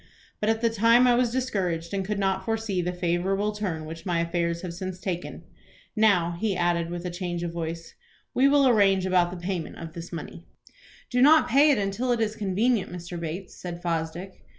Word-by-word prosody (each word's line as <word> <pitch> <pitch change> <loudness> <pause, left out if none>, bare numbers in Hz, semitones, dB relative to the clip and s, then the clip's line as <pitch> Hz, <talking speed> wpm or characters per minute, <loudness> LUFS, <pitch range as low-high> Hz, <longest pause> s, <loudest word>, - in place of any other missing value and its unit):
But 210 - 0
at 225 0 +1
the 230 -1 +2
time 230 +3 +5
I 245 - +5
was 240 0 +2
discouraged, 190 -10 -2
and 195 -1 -1
could 205 +2 -3
not 190 -1 0
foresee 220 -3 -1
the 175 +1 -2
favorable 180 +4 0
turn 185 -7 -4
which 165 +1 -8
my 175 -2 0
affairs 170 0 -1
have 175 -2 -5
since 185 +1 -6
taken. 180 -2 -5 0.5
Now," 200 -6 +3
he 210 -3 0
added, 170 -1 +1
with 175 +1 -5
a 180 - -3
change 175 -1 -4
of 170 -1 -4
voice, 165 0 -5 0.4
"we 265 +2 +4
will 280 -1 +5
arrange 195 -5 +4
about 180 -2 +3
the 180 - -7
payment 175 -2 -4
of 165 -2 -8
this 170 0 -8
money." 170 0 -8 0.6
"Do 250 0 +2
not 310 +3 +6
pay 280 +5 +5
it 285 - +4
until 205 +5 -1
it 240 - +1
is 220 -1 0
convenient, 210 +2 0
Mr. 175 0 -7
Bates," 170 +3 -6
said 175 -1 -6
Fosdick. 170 +2 -3
185 Hz, 200 wpm, -26 LUFS, 170-220 Hz, 0.6 s, not